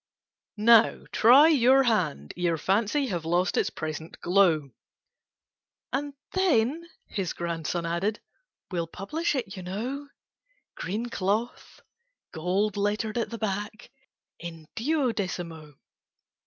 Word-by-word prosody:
"Now 225 +1 +5
try 270 +8 +7
your 270 -2 +5
hand, 210 - 0
ere 170 -2 0
Fancy 215 - +1
Have 175 -4 -2
lost 175 +3 +1
its - - +1
present 155 +1 -6
glow—" 175 -7 +3 1.2
"And 285 +1 -2 0.2
then," 330 -3 +1 0.2
his 190 -4 -3
grandson 170 0 -3
added, 180 +6 -1 0.5
"We'll 170 -2 -2
publish 295 - -2
it, 235 -8 -3
you 185 - -7
know: 240 +11 -4 0.7
Green 215 +6 -3
cloth—gold 210 - -3
lettered 210 +3 -1
at 230 - -2
the 230 - -6
back— 210 +1 -4 0.5
In 165 -2 -8
duodecimo!" 190 - -2
205 Hz, 105 wpm, -27 LUFS, 175-240 Hz, 1.2 s, try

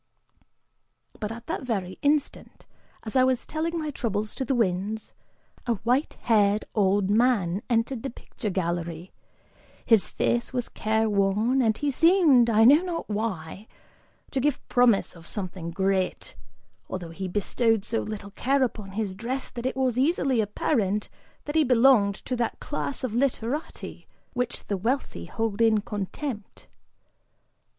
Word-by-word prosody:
But 210 0 -3
at 235 +1 -8
that 325 - -3
very 195 -8 -3
instant, 290 0 -1 0.4
as 220 - -6
I 255 - +6
was 255 -1 +1
telling 330 +2 -2
my 310 -2 -2
troubles 215 -5 -2
to - - -3
the 265 +1 0
winds, 210 0 -1 0.5
a 235 - +2
white 250 +6 +1
haired 210 -2 +3
old 200 -1 +2
man 210 -5 +2
entered 230 +1 0
the 270 - -3
picture 225 -2 -6
gallery; 170 -2 -3 0.7
his 220 -7 +4
face 240 0 0
was 245 -2 -2
care 220 +1 0
worn, 210 +5 +2
and 220 -3 +2
he 290 -1 0
seemed, 310 -6 +5
I 220 0 +5
know 285 +7 +7
not 350 -7 -4
why, 205 -2 -4 0.6
to 270 - 0
give 285 +1 -1
promise 245 -7 +3
of 165 -1 -13
something 185 -4 -5
great, 190 +1 -1 0.5
although 175 -3 -5
he 190 +3 -5
bestowed 210 +3 +1
so 225 +1 0
little 205 -2 -6
care 270 +6 +1
upon 210 -5 -4
his 205 -2 -2
dress 245 +7 -4
that 240 +1 -3
it - - -3
was 255 -2 +1
easily 275 -4 +2
apparent 210 -1 0 0.4
that 295 - -4
he 315 0 +4
belonged 240 -5 +5
to 255 - -1
that 235 -1 -2
class 145 - -4
of 250 -4 -2
literati 260 +3 -2 0.3
which 245 -1 -2
the 200 - -2
wealthy 225 - -2
hold 225 - -2
in 220 -2 +4
contempt. 210 +3 -5
225 Hz, 150 wpm, -26 LUFS, 200-255 Hz, 0.7 s, know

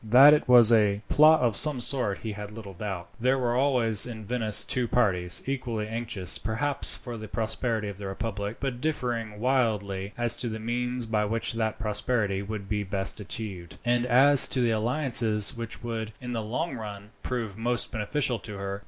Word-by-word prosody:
That 130 +7 +7
it 150 - +1
was 120 -2 +7
a 105 -2 +2
plot 155 +1 +5
of 120 -4 +1
some 150 +3 +4
sort 120 -5 -2
he 110 - -4
had 105 0 -7
little 105 -2 -10
doubt. 95 -2 -6
There 130 +3 +1
were 120 -2 -1
always 125 -5 +3
in 110 -3 -8
Venice 110 -2 +3
two 125 -2 +1
parties, 95 -7 +1
equally 120 -5 -3
anxious 110 -5 -2
perhaps 130 +6 0
for 120 -2 -8
the 110 0 -8
prosperity 110 0 -2
of 100 -1 -8
the 100 - -6
republic, 100 +1 -5
but 130 -3 -4
differing 120 -8 -3
widely 105 -6 -1
as 120 -1 +3
to 120 - 0
the 110 - -5
means 120 +2 -3
by 110 -1 -1
which 115 +2 0
that 110 -1 -2
prosperity 105 -2 -1
would 100 -1 -6
be 105 0 -2
best 95 +2 -2
achieved, 95 -2 -7
and 120 0 +1
as 135 +3 +6
to 130 - 0
the 120 -1 +2
alliances 115 -1 +2
which 115 0 -8
would, 110 -2 -5
in 125 -1 -7
the 115 -2 -3
long 130 +10 -3
run, 105 -2 -9
prove 115 -6 -4
most 120 +2 -2
beneficial 120 +2 -1
to 105 -3 -9
her. 100 0 -5
115 Hz, 190 wpm, -26 LUFS, 105-125 Hz, -, That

